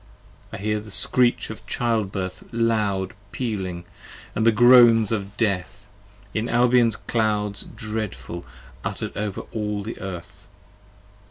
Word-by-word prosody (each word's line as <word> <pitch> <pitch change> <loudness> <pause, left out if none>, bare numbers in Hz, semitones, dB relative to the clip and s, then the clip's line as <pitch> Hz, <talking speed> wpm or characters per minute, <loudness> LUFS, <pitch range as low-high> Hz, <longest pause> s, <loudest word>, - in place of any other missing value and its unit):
I - - -5
hear 105 +1 -1
the 105 +1 -11
screech 120 +4 +2
of 110 - -10
Childbirth 100 -6 -1
loud 105 -5 0 0.2
pealing, 95 -8 -3 0.3
& - - -16
the 115 +1 +4
groans 120 -2 +7
Of 100 -2 -3
Death, 100 -2 -1 0.5
in 110 +2 -1
Albion's 120 -2 +4
clouds 105 -3 -1
dreadful 105 -6 -5 0.4
utter - - -3
'd - - -22
over 100 -1 -3
all 105 -2 -2
the 110 +3 -6
Earth. 95 -3 -8
105 Hz, 120 wpm, -24 LUFS, 100-115 Hz, 0.5 s, groans